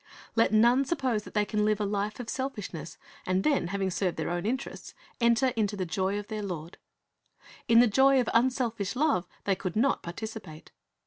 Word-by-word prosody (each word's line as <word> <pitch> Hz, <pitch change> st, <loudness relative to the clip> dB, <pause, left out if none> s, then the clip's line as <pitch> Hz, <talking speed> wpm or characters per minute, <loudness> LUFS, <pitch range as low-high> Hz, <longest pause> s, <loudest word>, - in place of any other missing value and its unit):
Let 230 Hz, -2 st, +3 dB
none 235 Hz, +5 st, +5 dB
suppose 260 Hz, -8 st, -1 dB
that -, -, -12 dB
they 210 Hz, 0 st, +3 dB
can 210 Hz, +1 st, 0 dB
live 215 Hz, 0 st, +2 dB
a 210 Hz, -, 0 dB
life 205 Hz, +2 st, -2 dB
of 245 Hz, -, -6 dB
selfishness, 210 Hz, -, -5 dB, 0.3 s
and 185 Hz, +1 st, 0 dB
then, 285 Hz, -, +2 dB
having 195 Hz, 0 st, -1 dB
served 180 Hz, -1 st, -1 dB
their 160 Hz, +1 st, -2 dB
own 175 Hz, +3 st, -2 dB
interests, 260 Hz, +4 st, -4 dB, 0.2 s
enter 235 Hz, +2 st, +3 dB
into 215 Hz, -4 st, -1 dB
the 185 Hz, -, -2 dB
joy 190 Hz, +3 st, -1 dB
of 205 Hz, 0 st, -6 dB
their 215 Hz, -1 st, -4 dB
Lord. 175 Hz, -4 st, -6 dB, 0.9 s
In 230 Hz, 0 st, +7 dB
the -, -, +6 dB
joy 265 Hz, +5 st, +4 dB
of 245 Hz, -, 0 dB
unselfish 235 Hz, -4 st, +1 dB
love 270 Hz, -, +1 dB, 0.2 s
they 200 Hz, -, +2 dB
could 185 Hz, -1 st, -4 dB
not 265 Hz, +6 st, +2 dB
participate. 180 Hz, -3 st, -8 dB
215 Hz, 190 wpm, -28 LUFS, 190-245 Hz, 0.9 s, In